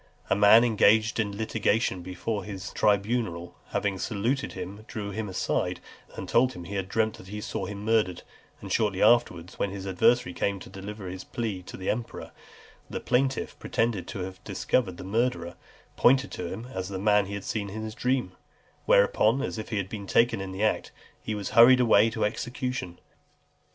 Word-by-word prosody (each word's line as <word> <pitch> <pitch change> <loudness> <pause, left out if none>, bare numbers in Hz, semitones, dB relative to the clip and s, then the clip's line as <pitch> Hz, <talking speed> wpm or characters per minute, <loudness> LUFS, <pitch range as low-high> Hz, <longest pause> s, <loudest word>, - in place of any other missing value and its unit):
A - - +5
man 105 +3 +7
engaged 110 -1 +3
in 110 - +2
a - - -8
litigation 110 -3 0
before 95 +4 -4
his 95 -1 -7
tribunal, 100 -4 0
having 95 -2 -1
saluted 115 +8 -1
him, 100 +4 -7
drew 100 -2 -5
him 110 0 -4
aside, 95 - -1 0.4
and - - -6
told 130 +2 +3
him 90 - -8
he 95 - -8
had 95 -1 -3
dreamt 110 +1 0
that 95 - -12
he 105 +2 -6
saw 95 -2 -4
him 100 +1 -7
murdered; 110 -5 +1 0.4
and - - -8
shortly 105 -4 +1
afterwards, 105 -7 +2
when 100 - 0
his 95 0 -7
adversary 95 +1 +2
came 100 +1 -1
to 95 - -12
deliver 100 0 -7
his 90 +1 -6
plea 110 -6 -4
to 90 - -10
the 95 - -1
emperor, 115 +1 -5 0.6
the - - -4
plaintiff, 130 +2 0
pretending 115 -5 -1
to 95 - -6
have 95 0 -8
discovered 95 -9 -1
the - - -8
murderer, 100 -4 -1 0.4
pointed 135 +2 +4
to 90 - -5
him 115 +3 -6
as 95 0 -4
the 95 - -4
man 105 0 +3
he 100 - -5
had 100 - -6
seen 100 -2 -3
in 110 +2 -6
his 110 0 -5
dream; 125 -4 0 0.6
whereupon, 110 +5 +4
as 115 - -3
if 110 - -6
he 110 - -2
had 100 -2 -1
been 100 0 -7
taken 115 -2 +3
in 95 -1 -5
the 95 +3 -3
act, 110 - 0 0.3
he 110 - -3
was 100 -2 -4
hurried 125 +2 +8
away 115 -3 +5
to 110 - -1
execution. 120 -4 -3
105 Hz, 190 wpm, -27 LUFS, 95-115 Hz, 0.6 s, hurried